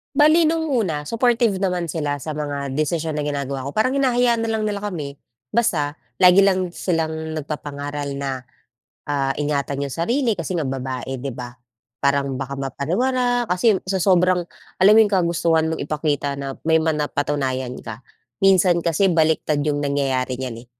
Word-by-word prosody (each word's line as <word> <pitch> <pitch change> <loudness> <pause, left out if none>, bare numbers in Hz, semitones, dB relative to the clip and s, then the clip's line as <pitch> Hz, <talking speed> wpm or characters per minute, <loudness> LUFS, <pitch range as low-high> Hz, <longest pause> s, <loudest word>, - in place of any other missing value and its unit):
Bale 310 +2 +5
no'ng 320 0 0
una, 170 - -1
supportive 230 -3 +2
naman 180 -3 -1
sila 145 -3 -2
sa 155 -1 -5
mga 145 -2 -3
desisyon 155 0 -1
na 150 - -1
ginagawa 140 -2 -3
ko. 140 - -5
Parang 255 +6 +1
hinahayaan 245 -3 +2
na 225 - -2
lang 220 - -1
nila 210 -1 -1
kami 165 -9 -5 0.3
basta 150 -10 0 0.2
lagi 185 +2 +7
lang 185 -2 +1
silang 160 -3 -2
nagpapangaral 145 -1 -5
na, 135 -2 -4 0.6
ah, 140 -2 -1
ingatan 140 -1 -1
'yong 140 - -5
sarili 235 - +1
kasi 180 -2 -3
nga 160 - -1
babae, 130 0 -4
'di 140 - -4
ba? 125 -1 -7 0.5
Parang 140 -1 0
baka 135 +1 -4
mapariwara 245 - 0
kasi 200 +3 +3
sa 190 0 -1
sobrang 180 -1 +3 0.4
alam 195 +3 +7
mo - - +8
'yong 205 - -3
kagustuhan 170 -3 +2
mong 160 - -3
ipakita 145 -2 -1
na 135 -1 -5
may 160 0 +4
ma 160 -1 0
napatunayan 135 -4 -2
ka? 110 0 -7 0.4
Minsan 185 -2 +4
kasi 170 +3 +2
baliktad 155 -2 +2
'yong 145 0 0
nangyayari 130 -3 -1
niyan, 120 -3 -6
eh. - - -29
155 Hz, 165 wpm, -21 LUFS, 140-190 Hz, 0.6 s, mo